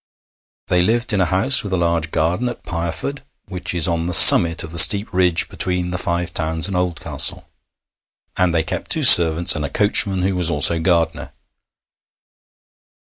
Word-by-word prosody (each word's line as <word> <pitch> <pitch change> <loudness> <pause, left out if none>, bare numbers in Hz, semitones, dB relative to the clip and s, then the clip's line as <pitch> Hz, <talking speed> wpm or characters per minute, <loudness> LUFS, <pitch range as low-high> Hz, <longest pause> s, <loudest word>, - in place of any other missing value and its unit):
They 90 -1 -2
lived 115 +5 -2
in 100 - -2
a 90 - -2
house 95 +10 +2
with 100 - -10
a - - -2
large 85 -2 -4
garden 85 +10 -4
at 120 - -12
Pireford, 85 - -7 0.3
which 90 -2 -6
is 85 -3 +3
on 85 -1 -5
the 90 - +1
summit 85 0 +7
of 80 - -12
the 85 - +2
steep 100 +6 +4
ridge 90 -2 -1
between 90 -1 -6
the 90 - -6
Five 85 -1 -6
Towns 80 +1 -3
and 100 - -7
Oldcastle, 80 -6 -1 0.9
and 90 -1 -2
they 80 -1 -3
kept - - -9
two - - -1
servants 85 0 +5
and 75 - -7
a 70 - -7
coachman, 100 -3 0
who 95 +1 -3
was 90 -2 -1
also 80 +2 +2
gardener. 80 -1 -4
85 Hz, 175 wpm, -15 LUFS, 80-95 Hz, 0.9 s, summit